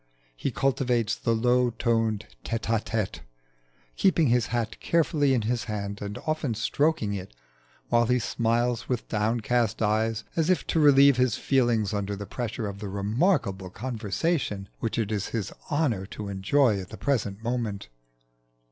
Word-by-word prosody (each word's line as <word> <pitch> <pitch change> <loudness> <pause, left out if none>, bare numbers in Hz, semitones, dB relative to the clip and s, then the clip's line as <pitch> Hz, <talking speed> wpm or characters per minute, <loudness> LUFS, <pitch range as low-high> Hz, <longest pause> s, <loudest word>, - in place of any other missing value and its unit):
He - - -2
cultivates 125 -4 +1
the 115 - 0
low 125 +2 +3
toned 115 -2 0 0.2
tête 115 -1 -3
à 115 -1 0
tête, 110 -4 -2 0.8
keeping 165 -6 +3
his 120 -2 +2
hat 115 -2 -2
carefully 150 -4 +2
in 115 - 0
his 120 +2 -1
hand 100 -3 -4
and 100 0 -5
often 155 -6 -1
stroking 120 -1 +1
it, 95 -11 -6 0.5
while 120 -1 +3
he 125 +1 +3
smiles 120 0 0
with 125 -3 -2
downcast 115 +1 0
eyes, 110 +1 +1
as 165 0 +1
if 185 - +2
to 165 - 0
relieve 140 -2 +6
his 125 -4 +2
feelings 120 -7 +1
under 100 0 -2
the 100 +1 -6
pressure 115 0 -4
of 100 -1 -5
the 105 -1 -5
remarkable 100 - 0
conversation 110 - -2
which 115 - -2
it 110 -2 -1
is 105 -2 -1
his 110 -5 -3 0.2
honour 130 -11 0
to 105 0 -7
enjoy 100 +3 +2
at 90 - -10
the - - -9
present 110 -7 -1
moment. 115 -4 -2
115 Hz, 155 wpm, -27 LUFS, 105-125 Hz, 0.8 s, relieve